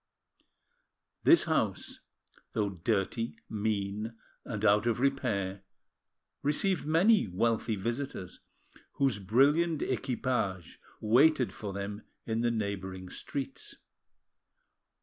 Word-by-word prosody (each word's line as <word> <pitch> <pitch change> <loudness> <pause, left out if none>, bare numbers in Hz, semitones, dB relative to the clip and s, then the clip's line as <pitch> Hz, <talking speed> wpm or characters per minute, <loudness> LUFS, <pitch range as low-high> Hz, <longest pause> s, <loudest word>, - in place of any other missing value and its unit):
This 340 - +7
house, 110 - -1 0.5
though 105 -2 0
dirty, 105 +5 -1
mean, 105 +1 -2 0.3
and 105 -2 -3
out 105 +2 +4
of 120 0 +1
repair, 110 -8 0 0.8
received 150 +3 +1
many 185 - +4
wealthy 110 +4 0
visitors, 115 -2 -4 0.5
whose 135 -7 +1
brilliant 145 - +3
equipages 125 - -2 0.2
waited 130 +4 +4
for 105 -2 -6
them 100 +2 -5 0.2
in 115 0 -1
the 120 - +2
neighbouring 95 -4 -3
streets. 140 -2 -5
115 Hz, 90 wpm, -30 LUFS, 100-135 Hz, 0.8 s, This